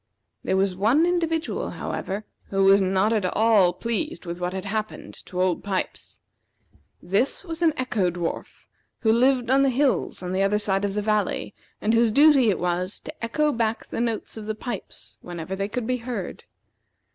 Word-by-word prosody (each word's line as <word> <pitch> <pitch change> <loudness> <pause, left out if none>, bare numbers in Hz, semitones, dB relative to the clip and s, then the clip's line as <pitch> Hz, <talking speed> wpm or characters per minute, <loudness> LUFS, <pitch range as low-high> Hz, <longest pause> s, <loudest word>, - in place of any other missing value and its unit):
There 190 - +1
was 190 -1 +1
one 230 - +3
individual, 330 -2 -1
however, 200 +3 -4 0.2
who 195 0 0
was 195 +1 +6
not 190 +3 +2
at 215 -3 +1
all 205 -1 +4
pleased 235 - -3
with 175 +1 -6
what 180 0 -1
had 190 +1 -5
happened 215 +2 -4
to 180 - -5
Old 185 -2 +1
Pipes. 195 -2 -4 0.8
This 205 - +1
was 330 -1 -4
an 330 -2 +5
Echo 235 -8 0
dwarf, 175 -1 -5 0.4
who 220 - +3
lived 250 +1 +3
on 270 +1 +5
the 275 - +4
hills 265 -6 0
on 180 0 -3
the 190 - +1
other 195 +1 +2
side 200 -1 0
of 200 0 -3
the 210 - -1
valley, 215 -1 0 0.3
and 220 - +1
whose 230 -1 +4
duty 280 -2 +6
it 195 - +1
was 180 +2 -2
to 300 -4 -10
echo 300 +6 +1
back 230 -3 -2
the - - -2
notes 230 -1 -2
of 215 -1 -7
the 215 - -2
pipes 220 -2 -7
whenever 175 +1 -6
they 195 +1 -2
could 225 +3 -3
be 250 +2 0
heard. 245 0 -6
215 Hz, 185 wpm, -24 LUFS, 190-250 Hz, 0.8 s, was